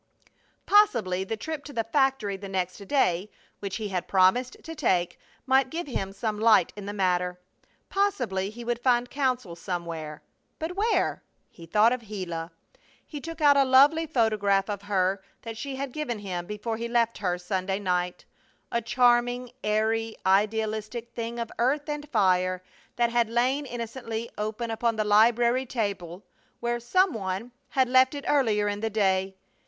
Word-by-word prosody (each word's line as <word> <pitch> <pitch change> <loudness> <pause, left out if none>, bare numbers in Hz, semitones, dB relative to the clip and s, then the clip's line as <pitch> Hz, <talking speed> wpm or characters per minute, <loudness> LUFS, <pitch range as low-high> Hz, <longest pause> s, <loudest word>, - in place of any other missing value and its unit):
Possibly 225 - +3
the 220 +3 -3
trip 315 +3 -5
to 290 - -9
the 230 -2 0
factory 265 -4 +1
the 195 0 -8
next 185 -1 -2
day, 190 -8 +1 0.3
which 200 -1 -4
he 215 -2 -3
had 180 -2 -3
promised 195 +7 +3
to 325 - -7
take, 185 - 0 0.3
might 265 0 +3
give 335 +5 -4
him 195 -8 -3
some 210 +1 -3
light 215 -5 +4
in 205 -1 -8
the - - -2
matter. 180 -2 0 0.5
Possibly 245 - 0
he 235 +3 -9
would 240 0 -1
find 245 0 +2
counsel 255 -10 -1
somewhere. 170 -4 -5 0.3
But 325 +3 -4
where? 435 +4 +1 0.3
He 165 -1 -13
thought 215 +7 +4
of 235 -3 -6
Gila. 175 -5 -5 0.6
He 295 -2 -8
took 330 +1 -7
out 290 -1 +6
a 280 - +5
lovely 285 +5 +5
photograph 210 -7 +2
of 200 -1 -4
her 195 -1 0 0.2
that 225 -1 -6
she 270 +4 -5
had 275 0 -4
given 245 -5 -3
him 180 -4 -5
before 210 +2 -4
he 235 +1 -3
left 235 -1 +1
her 180 -3 0
Sunday 185 +1 -2
night 180 -2 -2 0.5
a 235 - 0
charming, 245 +1 +2
airy, 220 +1 0
idealistic 215 +3 0
thing 235 0 -4
of 230 -1 -4
earth 280 +5 +1
and 295 -1 -4
fire 185 -5 +2 0.3
that 235 -1 +2
had 235 -1 +2
lain 255 +5 +1
innocently 230 -1 -5
open 215 +2 -3
upon 230 0 0
the 215 - 0
library 235 +4 +4
table 200 -6 -3 0.4
where 240 0 -1
some 365 +9 +2
one 195 +3 -4
(?) - - -44
had 260 -1 +5
left 260 +2 +4
it 285 - -6
earlier 220 -8 +2
in 205 0 -2
the 225 +1 -1
day. 190 -2 +1
225 Hz, 170 wpm, -27 LUFS, 195-255 Hz, 0.6 s, out